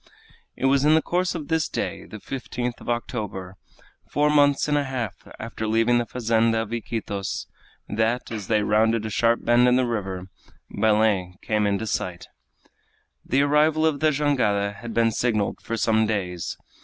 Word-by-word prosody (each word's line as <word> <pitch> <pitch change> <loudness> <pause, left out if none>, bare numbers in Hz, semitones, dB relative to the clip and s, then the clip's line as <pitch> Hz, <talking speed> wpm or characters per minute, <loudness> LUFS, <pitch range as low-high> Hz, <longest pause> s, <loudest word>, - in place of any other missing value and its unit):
It - - -3
was 135 +1 +3
in 155 +1 +5
the 160 - +4
course 180 +1 0
of 155 -4 -5
this 160 -1 0
day, - - -4
the 110 - -9
15th 125 +1 -5
of - - -8
October 105 -6 -4 0.5
four 150 +1 +2
months 145 -1 +4
and 150 - +1
a 145 -1 +1
half 125 -6 -3 0.2
after 110 -1 -5
leaving 115 +2 +3
the 120 - -2
fazenda 115 -1 +1
of 115 +1 -8
Iquitos 110 -4 -4 0.4
that, 115 +3 -1
as 105 -4 -5
they 105 -2 +2
rounded 110 +1 +2
a 110 - -4
sharp 115 +3 +1
bend 120 +1 +5
in 125 - +4
the 130 0 +3
river, 95 -6 -3 0.5
Belem 105 -4 +2
came 105 -1 +1
into 100 +2 -1
sight. 90 -4 -3 1.0
The 135 +3 +2
arrival 155 +2 +3
of 155 -3 +1
the 155 - +3
jangada 125 -9 +1
had 115 +2 -8
been 115 -1 +3
signaled 110 -3 -1
for 115 - -4
some 110 -1 +2
days. 90 -6 -3
115 Hz, 170 wpm, -24 LUFS, 105-135 Hz, 1.0 s, in